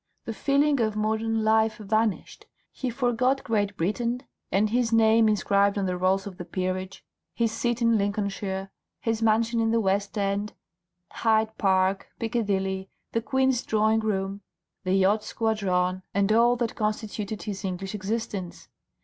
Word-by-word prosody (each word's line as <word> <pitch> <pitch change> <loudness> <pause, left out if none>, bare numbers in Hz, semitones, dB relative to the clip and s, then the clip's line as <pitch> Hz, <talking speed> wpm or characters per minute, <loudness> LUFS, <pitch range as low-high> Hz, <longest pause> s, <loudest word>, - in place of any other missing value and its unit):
The 225 - -4
feeling 280 +3 +2
of 215 -2 +1
modern 220 +1 0
life 220 0 +3
vanished, 215 0 -1 0.2
he 255 - -3
forgot 250 +2 +1
Great 205 -3 -1
Britain 235 +8 -1 0.3
and 210 +3 +2
his 240 -1 +1
name 225 0 +5
inscribed 200 -1 +2
on 200 - 0
the 180 -1 -1
rolls 185 +2 +1
of 195 -3 -8
the - - -4
peerage, 185 +2 -4 0.3
his 230 -2 +1
seat 240 +1 -1
in 230 -2 +4
Lincolnshire, 200 -1 -2 0.3
his 225 -1 -1
mansion 225 +1 +2
in 225 0 +2
the 230 0 +2
West 200 0 0
End, 200 +1 -1 0.6
Hyde 220 -1 +1
Park, 190 -1 +2
Piccadilly, 195 -5 -1 0.2
the 230 - 0
Queen's 265 0 +1
Drawing 220 -1 +2
Room, 200 -2 -2 0.4
the 185 +1 +2
Yacht 200 +3 +3
Squadron, 185 -5 0
and 200 +1 +2
all 235 +2 +5
that 235 -2 -2
constituted 210 -2 -3
his 200 -1 -5
English 190 +1 -4
existence. 205 -2 -4
215 Hz, 150 wpm, -26 LUFS, 195-225 Hz, 0.6 s, name